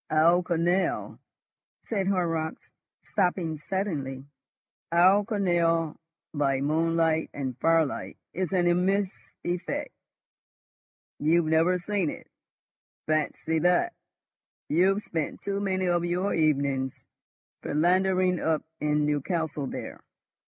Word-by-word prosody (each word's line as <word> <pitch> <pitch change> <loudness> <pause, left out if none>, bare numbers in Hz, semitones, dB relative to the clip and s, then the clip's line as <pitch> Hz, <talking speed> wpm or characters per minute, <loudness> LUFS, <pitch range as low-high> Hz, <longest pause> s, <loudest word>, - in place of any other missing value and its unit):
"Our 165 +3 +4
canal," 175 +2 0 0.7
said 195 -4 -1
Horrocks, 165 -4 -1 0.3
stopping 180 -5 0
suddenly. 145 -8 -3 0.7
"Our 185 +4 +5
canal 170 -6 +1 0.4
by 140 -3 +1
moonlight 160 +2 +1
and 130 -3 -3
firelight 165 -3 +1 0.2
is 185 -1 -2
an 180 -2 +2
immense 185 +3 +2 0.3
effect. 175 0 -3 1.3
You've 165 +3 +3
never 165 +3 +3
seen 185 -2 -1
it? - - -8 0.8
Fancy 155 +1 0
that! 180 - +2 0.8
You've 190 +6 +3
spent 160 -3 -4
too 200 0 -2
many 190 -2 0
of 175 -1 +1
your 180 +3 0
evenings 140 -4 +1 0.7
philandering 185 +3 +2
up 160 -1 0 0.2
in 150 0 +1
Newcastle 150 0 -1
there. - - -7
170 Hz, 100 wpm, -27 LUFS, 155-185 Hz, 1.3 s, Our